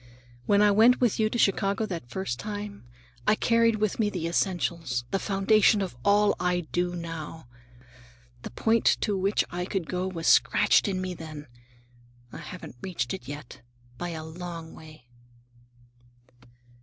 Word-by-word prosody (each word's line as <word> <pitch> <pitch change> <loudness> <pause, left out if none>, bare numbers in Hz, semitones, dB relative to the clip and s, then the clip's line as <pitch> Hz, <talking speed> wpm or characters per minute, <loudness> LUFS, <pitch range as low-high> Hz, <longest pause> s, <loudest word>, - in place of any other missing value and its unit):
When 205 0 +4
I 205 - +5
went 225 +5 +5
with 240 -4 +1
you 215 -1 +3
to 240 - -3
Chicago 200 0 +2
that 170 - -6
first 160 -9 -4
time, 205 - -6 0.4
I 215 - +5
carried 230 0 +3
with 215 0 -1
me 210 -2 +2
the 180 -5 -3
essentials, 170 -7 -1
the 195 - +1
foundation 205 +2 +3
of 190 -10 -3
all 205 +2 +4
I 180 0 +1
do 175 +2 -2
now. 165 -2 -7 1.0
The - - -7
point 225 - +2
to 205 - 0
which 195 +2 +1
I 175 0 -3
could 190 -2 -2
go 180 0 -2
was 170 -3 -5
scratched - - +4
in 190 -2 -1
me 185 -1 -3
then. 155 -3 -9 0.9
I - - -7
haven't 180 -8 -9
reached 145 -10 -3
it 120 - -7
yet, 145 -3 -9 0.4
by 175 - -3
a 160 -2 -5
long 165 0 -8
way." 155 -5 -14
185 Hz, 155 wpm, -27 LUFS, 165-205 Hz, 1.0 s, I